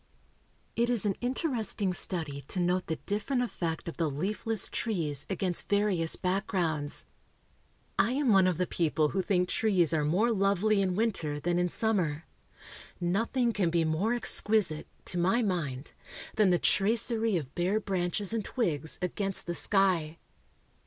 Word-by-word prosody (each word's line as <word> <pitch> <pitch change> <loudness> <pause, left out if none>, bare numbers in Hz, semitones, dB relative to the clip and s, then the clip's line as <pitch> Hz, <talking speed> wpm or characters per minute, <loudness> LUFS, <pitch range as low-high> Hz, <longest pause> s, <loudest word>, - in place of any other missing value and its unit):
It 235 +1 +1
is 235 -4 +2
an 200 - +2
interesting 240 - -1
study 160 -6 0
to 185 - -2
note 180 +1 +1
the 160 - -1
different 215 - -1
effect 170 -10 -3
of 170 - -6
the 165 -3 +1
leafless 200 +8 -1
trees 160 - -2
against 185 -2 -2
various 200 -5 +1
backgrounds. 175 -6 -1 0.9
I 240 - +3
am 275 -1 +1
one 195 -3 +6
of 180 -3 +1
the 180 - +1
people 155 -3 +1
who 190 - 0
think 180 -1 +1
trees 180 -6 +2
are 155 -2 +2
more 190 +11 +2
lovely 200 0 +2
in 185 -2 0
winter 180 -9 -1
than 175 +3 0
in 180 0 +1
summer. 170 -8 0 0.7
Nothing 225 +7 +1
can 190 -5 +1
be 165 -1 +1
more 180 +10 +1
exquisite, 210 -8 +1 0.2
to 180 - -3
my 190 +8 +2
mind, 150 -9 -3 0.4
than 210 -3 +4
the 175 - +4
tracery 220 +2 +2
of 140 -4 -6
bare 185 +5 +1
branches 195 +1 -1
and 225 -2 -1
twigs 160 - -2
against 195 +2 -3
the 175 - -2
sky. 175 -5 +1
185 Hz, 150 wpm, -29 LUFS, 165-215 Hz, 0.9 s, one